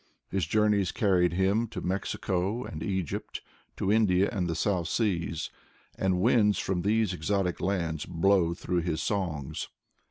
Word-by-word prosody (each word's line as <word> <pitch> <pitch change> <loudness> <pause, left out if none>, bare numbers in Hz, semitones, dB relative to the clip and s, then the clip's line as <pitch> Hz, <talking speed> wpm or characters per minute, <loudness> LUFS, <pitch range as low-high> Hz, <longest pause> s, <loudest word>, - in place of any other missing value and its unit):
His 95 -5 0
Journeya 105 -1 +2
carried 90 -5 +3
him 100 +6 +2
to - - -6
Mexico 95 +3 -2
and 80 -8 -7
Hgypt, 95 -6 -3 0.4
to 95 - 0
India 100 -3 +3
and 90 -3 -1
the 80 - -1
South 90 0 0
Seas, 85 -6 -1 0.4
and 95 -1 +1
winds 105 -1 +4
from 95 -2 -1
these 105 0 +1
exotic 90 +1 -1
lands 85 -5 -1
blow 90 0 +2
through 90 0 -1
his 80 -2 -2
songs. 85 -9 -2
95 Hz, 140 wpm, -28 LUFS, 85-100 Hz, 0.4 s, winds